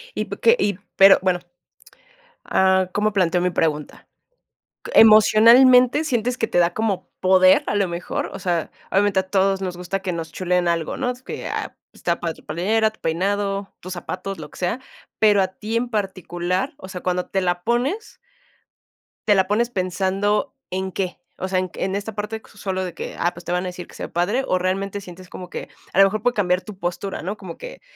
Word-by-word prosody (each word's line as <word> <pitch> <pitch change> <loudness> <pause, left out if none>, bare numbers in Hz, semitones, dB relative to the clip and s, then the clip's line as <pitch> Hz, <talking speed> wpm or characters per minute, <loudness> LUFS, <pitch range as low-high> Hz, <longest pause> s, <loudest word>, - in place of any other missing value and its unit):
Y - - -1
p - - -7
que 465 +1 +5
y 205 - 0 0.2
pero, 195 0 +8
bueno, 185 -1 +1 1.1
ah, 190 -1 +3
¿cómo 210 0 +1
planteo 180 -2 +2
mi 180 - +2
pregunta? 155 -4 -2 0.9
¿Emocionalmente 240 +5 +7
sientes 250 -3 -1
que 225 - +1
te - - 0
da 175 0 +3
como 215 -4 -1
poder, 185 0 +5
a 205 - -1
lo 200 - +2
mejor? 170 +1 -4
O - - -5
sea, 175 -3 -1 0.2
obviamente 200 0 +3
a - - -2
todos 195 -1 +2
nos 180 -2 -3
gusta 180 +2 -3
que 185 -1 -3
nos 165 -1 -5
chuleen 180 -1 0
algo, 165 -2 -1
¿no?, 250 -2 -1
que, 250 +1 -8
ah, - - -4 0.2
está 170 -1 -2
padre 165 -2 -2
tu - - -19
playera, 215 +8 +1
tu 220 - -25
peinado, 195 +4 -1
tus 185 - -7
zapatos, 185 +2 -5
lo 150 -2 -9
que - - -14
sea. 185 +8 -1 0.4
Pero 210 -2 +5
a 190 - 0
ti 215 +4 -5
en 240 +1 0
particular, 185 0 -2
o 190 - -10
sea, 185 -2 -7
cuando 180 0 -1
te 195 - -1
la 175 -1 0
pones 270 - -1 1.1
te 205 - +5
la 190 -1 +3
pones 225 +4 +1
pensando, 195 +4 -1 0.2
¿en 190 +1 -2
qué?, 185 -1 -3 0.2
o 185 - -3
sea, 190 0 0
en 185 -1 -3
en 190 +1 -2
esta 205 +2 -4
parte 210 +2 -4
q - - -20
solo 190 -2 -2
de 180 -2 -5
que, - - -7
ah, 175 - 0
pues 175 0 -12
te - - -4
van 180 0 0
a - - -4
decir 180 -1 -7
que - - -16
se - - -7
ve - - -10
padre 200 +10 0
o, 185 - +2
¿realmente 195 +2 -2
sientes 185 -1 -12
como 180 -1 -9
que - - -7 0.2
a - - -6
lo - - +10
mejor 205 +2 -1
puede 245 +2 +1
cambiar 180 -3 +1
tu 195 +1 -10
postura, 180 +2 -4
no? 195 +5 -3
Como 185 -5 -9
que, - - -9
190 Hz, 210 wpm, -22 LUFS, 180-210 Hz, 1.1 s, lo